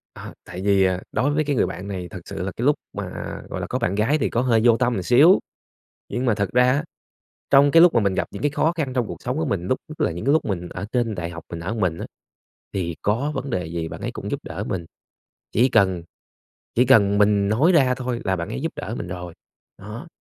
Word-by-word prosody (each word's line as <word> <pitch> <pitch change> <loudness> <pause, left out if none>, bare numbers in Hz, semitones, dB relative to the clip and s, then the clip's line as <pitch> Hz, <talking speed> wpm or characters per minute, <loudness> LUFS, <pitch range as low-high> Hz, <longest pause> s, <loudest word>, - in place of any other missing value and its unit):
Ờ, - - -9
tại 90 - -7
vì, 100 -1 +3
à, 90 -1 +1
đối 140 - +1
với 155 +1 +1
cái 145 -1 -1
người - - +3
bạn 90 +4 -6
này 90 -3 -5
thật - - -8
sự - - -6
là 95 - -3
cái 120 - -4
lúc 145 +1 +4 0.2
mà, - - -5 0.4
gọi - - -4
là, - - -4
có - - -2
bạn 95 - 0
gái 115 +9 +2
thì - - 0
có 120 - 0
hơi 115 -3 +3
vô 115 -1 +5
tâm 125 0 +1
một 95 -5 -2
xíu. 140 - +6 0.7
Nhưng 125 +1 -2
mà 115 -4 +2
thật 100 -2 -1
ra 125 +1 +5
á, 145 +4 +1 0.7
trong 140 +1 +6
cái 165 - +6
lúc 175 - +6
mà 115 - +4
mình 100 -3 +1
gặp - - -1
những - - -8
cái 145 - +2
khó 155 +3 +1
khăn 145 -5 -2
trong 125 -3 0
cuộc - - -8
sống 125 +3 -2
của 160 - 0
mình 100 - -2
lúc 130 - 0
nhất 155 - -11
là - - +1
những 85 +6 -6
cái 140 - +3
lúc 160 - +2
mình 90 -4 -3
ở 95 +4 -6
trên 120 -3 0
đại 85 -3 -4
học 85 -1 -9
mình 85 -1 -5
ở 95 +7 -3
mình 90 -6 -1
á, - - -5 0.7
thì 85 -4 -2
có 120 +9 0
vấn 135 +1 -4
đề 90 -6 -2
gì 80 0 -4
bạn - - -8
ấy - - -3
cũng - - -6
giúp - - -1
đỡ - - -5
mình, 85 -3 -3 0.7
chỉ 125 +5 +3
cần 95 -6 +2 0.7
chỉ 125 +2 +4
cần 100 -6 +5
mình 100 -1 +3
nói 145 +12 +4
ra 135 -7 +4
thôi 125 -2 -3
là 95 0 0
bạn 85 +3 -4
ấy 130 - -4
giúp 165 - -2
đỡ 115 - -5
mình - - -5
rồi, 90 -2 -7 0.4
đó. 110 - -9
110 Hz, 265 wpm, -23 LUFS, 95-130 Hz, 0.7 s, xíu